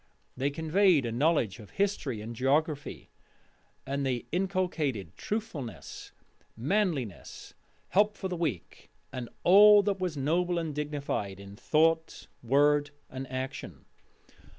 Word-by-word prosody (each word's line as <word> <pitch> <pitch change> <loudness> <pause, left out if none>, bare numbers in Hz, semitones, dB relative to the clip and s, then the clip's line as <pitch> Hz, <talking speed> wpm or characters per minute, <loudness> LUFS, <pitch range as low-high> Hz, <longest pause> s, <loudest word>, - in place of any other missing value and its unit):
They 135 +2 0
conveyed 160 0 +3
a 115 - -2
knowledge 120 - +1
of 105 - -12
history 190 - -1
and 115 +2 -7
geography, 145 +4 -1 0.7
and 140 +1 -2
they 125 -3 -1
inculcated 170 - -1
truthfulness, 205 - -6 0.5
manliness, 145 - -2 0.4
help 210 +2 +2
for 190 - -3
the 185 - -3
weak, 150 - -4 0.2
and 125 -2 -5
all 205 +2 +8
that 200 -1 -1
was 180 -5 -2
noble 175 +5 +1
and 165 -3 -2
dignified 140 -10 -3
in 100 0 -11
thought, 160 +7 +1 0.2
word, 145 +4 +3 0.2
and 130 0 -7
action. 130 +1 -6
145 Hz, 120 wpm, -29 LUFS, 130-180 Hz, 0.7 s, all